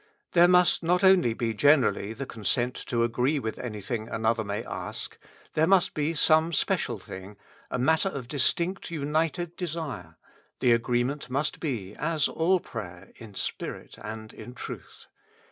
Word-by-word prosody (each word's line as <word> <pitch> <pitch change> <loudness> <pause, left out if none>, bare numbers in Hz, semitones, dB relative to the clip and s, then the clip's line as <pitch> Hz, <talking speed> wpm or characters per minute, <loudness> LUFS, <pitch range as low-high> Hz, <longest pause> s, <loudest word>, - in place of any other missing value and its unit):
There 175 0 +6
must 180 0 +5
not 180 +3 +2
only 180 -12 +5
be 115 -1 -1
generally 115 -5 +3
the 135 - -5
consent 120 +2 -1
to 120 -1 +1
agree 125 +5 +1
with 110 -5 -4
anything 110 -1 -4
another 110 0 +1
may 105 +2 -3
ask: - - -5 0.4
there 155 +1 +3
must 190 0 +4
be 155 +2 -1
some 160 +2 +4
special - - 0
thing, 95 +2 -10 0.3
matter 160 +9 +2
of 135 -8 -6
distinct 170 +7 0
united 160 +2 -1
desire; 165 -4 -5 0.4
the 125 - +4
agreement 120 +4 +1
must 140 +4 -1
be, 110 - -3
as 155 0 +1
all 180 +3 +2
prayer, 95 - -8
in 110 -4 -12
spirit - - -5
and 110 0 -7
in 125 - -10
truth. - - -9
135 Hz, 145 wpm, -27 LUFS, 115-160 Hz, 0.4 s, There